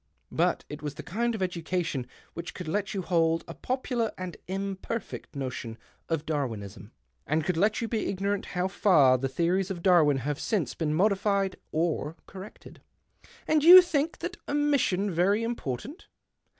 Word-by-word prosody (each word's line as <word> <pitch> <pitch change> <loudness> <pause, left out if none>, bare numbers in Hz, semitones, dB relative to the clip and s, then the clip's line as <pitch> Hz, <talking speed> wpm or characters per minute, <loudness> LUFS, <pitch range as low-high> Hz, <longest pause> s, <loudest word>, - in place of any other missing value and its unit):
But - - +1
it 150 0 -8
vas 145 -2 -5
the - - -8
kind 235 +4 -1
of 195 - -2
education 170 -6 -2 0.3
which 170 0 -7
could 180 - -7
let 200 +5 -1
rou 190 - -2
hold 165 -2 +2
a - - -7
popular 250 -3 -2
and 185 -1 -6
imperfect 195 +1 -5
notion 125 -4 -5 0.3
of 160 -2 -1
Darwinism, 110 -9 -4 0.4
and 155 +2 +1
could 180 - 0
let 205 +8 +2
you 230 - -1
be 225 -1 -1
ignorant 200 +1 -2
low 180 +1 +1
far 150 -10 +4
the 135 +1 -1
theories 175 +7 0
of 175 -3 -5
Darwin 160 -7 +5
have 145 +3 -3
since 200 -8 -1
3een 155 -2 -1
modified 195 +1 +1 0.2
or 160 -1 -1
corrected." 195 +1 -12 0.3
" - - -25
And 310 -1 +3
you 355 +3 +12
think 320 -2 -1
that 345 +1 -5
omission 280 -10 +1
very 195 +6 +2
impor 230 - -2
tant 300 - -11
185 Hz, 165 wpm, -28 LUFS, 155-210 Hz, 0.4 s, you